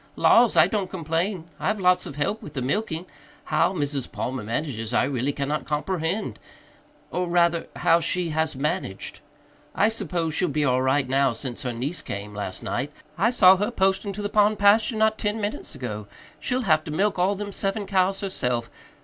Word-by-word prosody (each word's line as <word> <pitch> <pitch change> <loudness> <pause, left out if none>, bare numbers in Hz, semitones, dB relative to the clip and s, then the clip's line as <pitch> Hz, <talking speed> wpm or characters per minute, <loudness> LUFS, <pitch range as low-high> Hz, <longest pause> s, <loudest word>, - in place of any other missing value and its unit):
"Laws, 235 -1 +5
I - - +8
don't 200 -4 -2
complain 170 +1 -2 0.2
I've 215 -1 0
lots 180 -1 +3
of 140 - -8
help 150 +9 -1
with 150 - -10
the 135 - -3
milking. 170 - -2 0.4
How - - +2
Mrs. 145 -6 -3
Palmer 130 +1 -3
manages, 115 0 -3
I - - +4
really 130 0 0
cannot 140 0 -2
comperhend 165 +5 -2 0.7
or 180 0 -1
rather, 170 -1 +2
how 165 0 +4
she 170 +1 -1
has 160 -1 0
managed. 130 -8 -3 0.6
I 215 - +4
suppose 175 -7 -2
she'll 180 - +1
be 150 -1 0
all 130 -1 +2
right 130 +1 +2
now 135 -1 +2
since 120 +1 -6
her 125 - -2
niece 140 +8 -4
came 100 -3 -6
last 100 -3 -5
night. 135 +4 -2 0.2
I 200 +8 +3
saw 190 -6 +6
her 205 +3 0
posting 195 -2 +1
to 205 +1 -5
the - - 0
pond 210 0 +3
pasture 210 +4 +4
not 220 0 +2
ten 210 +1 -1
minutes 205 -6 -4
ago. 105 -5 -5 0.3
She'll 255 0 -1
have 155 -8 +3
to 150 - -5
milk 195 +4 +1
all 190 +3 +2
them 205 +1 -5
seven 200 +1 -2
cows 190 0 +1
herself. 125 - -2
165 Hz, 185 wpm, -25 LUFS, 135-200 Hz, 0.7 s, I